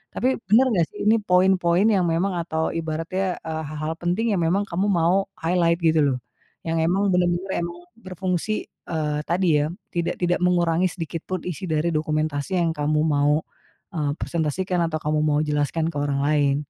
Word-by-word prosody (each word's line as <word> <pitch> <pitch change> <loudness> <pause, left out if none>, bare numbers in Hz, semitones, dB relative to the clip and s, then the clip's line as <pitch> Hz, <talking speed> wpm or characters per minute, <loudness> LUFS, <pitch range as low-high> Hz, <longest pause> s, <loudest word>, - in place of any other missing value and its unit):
tapi 260 +1 +1
benar 235 +5 +6
nggak 175 -6 +3
sih - - -11
ini 225 +1 +5
poin-poin 185 -1 +3
yang 190 -4 +2
memang 175 +4 0
atau 160 -1 -1
ibaratnya, 165 +4 -2
eee, 160 0 -4
hal-hal 155 +1 -3
penting 200 +5 0
yang - - 0
memang 190 +5 +2
kamu 185 +4 0
mau 180 +2 +2
highlight 170 0 +2
gitu 160 -1 +4
loh, 125 - -2 0.5
yang 165 0 0
memang 190 +5 +2
benar-benar 180 +1 +1
memang 170 0 -5 0.2
berfungsi, 185 +1 -2 0.3
eee, 150 -2 -1
tadi 170 -3 +2
ya, 150 - -1 0.3
tidak 170 -1 -1
tidak 175 0 +1
mengurangi 175 0 +2
sedikitpun 170 +1 -5
isi 180 +2 -4
dari 160 +2 +1
dokumentasi 155 +1 -1
yang 170 -1 +2
kamu 150 +1 0
mau, 150 0 +2 0.5
eee, 150 -2 0
presentasikan 175 +3 -1
atau 155 - -2
kamu 150 0 +1
mau 150 -1 +2
jelaskan 150 +2 0
ke 150 - -6
orang 140 -1 0
lain. 145 -2 +2
170 Hz, 170 wpm, -23 LUFS, 155-185 Hz, 0.5 s, benar